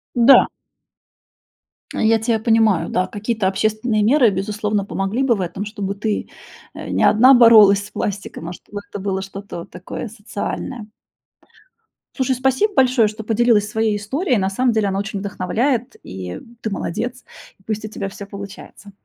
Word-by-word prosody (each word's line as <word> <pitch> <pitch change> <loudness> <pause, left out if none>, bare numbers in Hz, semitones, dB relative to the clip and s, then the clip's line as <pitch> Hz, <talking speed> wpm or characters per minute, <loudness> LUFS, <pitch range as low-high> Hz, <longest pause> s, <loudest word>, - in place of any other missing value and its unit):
Да. 245 +3 +7 1.5
Я 225 0 +2
тя 225 +1 +1
понимаю, 220 -7 +2
да. 185 +1 0
Какие-то 210 0 -2
общественные 215 +3 0
меры, 245 +2 +5
безусловно, 210 +1 -2
помогли 195 +5 -2
бы 250 -3 +3
в 195 - -4
этом, 185 +2 -4
чтобы 205 -2 -4
ты, 210 +1 -3 0.4
э, - - -8
не - - 0
одна 250 +5 +6
боролась 215 -5 +7
с - - -20
пластиком, 200 -5 -5
а - - -6
чтобы 205 +3 -9
это - - -6
было 190 -1 -2
что-то 195 -1 -8
вот 170 - -10
такое 185 +6 -7
социальное. 220 +2 -6 1.3
Слушай, 260 -1 0
спасибо 265 - +1
большое, 255 - +4
что 215 +1 -7
поделилась 220 -1 +2
своей 220 -1 0
историей. 255 - -1
На 190 -1 0
самом 245 +6 +1
деле 215 -2 +1
она 195 0 -1
очень 200 0 -4
вдохновляет, 220 +6 -1
и 90 -1 -7 0.2
ты 220 - -2
молодец. 235 +6 -4 0.4
И - - -27
пусть 215 +1 -4
у - - -4
тебя 200 -2 -5
всё 200 +1 -9
получается. 200 +1 -10
215 Hz, 160 wpm, -20 LUFS, 200-235 Hz, 1.5 s, Да